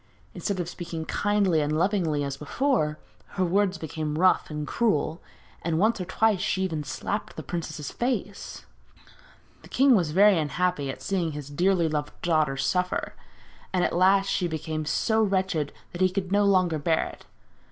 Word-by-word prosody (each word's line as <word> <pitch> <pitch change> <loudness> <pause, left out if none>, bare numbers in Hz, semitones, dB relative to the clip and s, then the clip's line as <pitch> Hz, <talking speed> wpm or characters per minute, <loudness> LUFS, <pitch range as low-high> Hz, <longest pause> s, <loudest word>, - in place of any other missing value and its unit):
Instead 200 -3 -3
of 175 - -2
speaking 170 -2 -6
kindly 200 -6 +1
and 150 +1 0
lovingly 170 -5 +1
as 140 -1 -3
before, 155 - 0 0.4
her 185 - +2
words 190 +1 +1
became 155 -1 -4
rough 185 +2 +3
and 150 -1 -4
cruel, 160 -6 0 0.4
and 165 -1 -1
once 215 +3 +2
or - - -3
twice 210 +2 +2
she 190 0 0
even 160 -5 -2
slapped 205 +8 -4
the - - -6
princess's 155 -4 -5
face. 235 -5 -3 1.0
The - - -15
king 270 -1 +5
was 175 -7 +1
very 195 +3 +5
unhappy 155 -1 -1
at 135 - -6
seeing 175 -5 -1
his 145 -1 -7
dearly 175 +2 +2
loved 150 -1 -3
daughter 155 -5 +2
suffer, 180 +5 -1 0.6
and 185 -1 +1
at - - 0
last 195 +2 +4
she 185 -2 0
became 155 -1 -4
so 220 +8 +1
wretched 190 -7 0 0.2
that 175 - -6
he 185 - +5
could 185 0 -3
no 205 0 +3
longer 185 -5 +3
bear 160 +2 +1
it. - - -11
175 Hz, 170 wpm, -26 LUFS, 155-195 Hz, 1.0 s, king